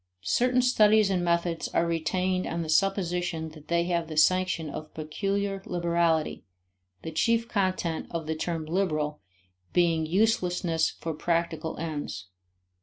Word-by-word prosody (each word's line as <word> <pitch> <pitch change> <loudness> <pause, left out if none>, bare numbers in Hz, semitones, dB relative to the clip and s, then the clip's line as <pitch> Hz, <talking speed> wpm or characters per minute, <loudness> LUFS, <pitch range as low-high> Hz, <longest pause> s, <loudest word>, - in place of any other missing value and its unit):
Certain 250 +1 +3
studies 215 -4 +4
and 180 -2 +1
methods 170 -1 0
are 170 - +1
retained 180 +3 0
on 170 0 -2
the 160 - -6
supposition 175 -2 0
that 155 -1 -14
they 170 0 +2
have 170 -2 -1
the 155 -1 -7
sanction 185 0 +3
of 155 +1 -7
peculiar 195 +5 -2
liberality, 170 -3 0 0.6
the 160 - -5
chief 230 +8 +1
content 185 -6 -1
of 165 -2 -4
the 160 - -1
term 165 0 -3
liberal 155 -4 -1 0.5
being 165 -2 +2
uselessness 180 -4 +1
for 165 - -5
practical 165 0 -1
ends. 145 - -5
170 Hz, 135 wpm, -27 LUFS, 160-185 Hz, 0.6 s, studies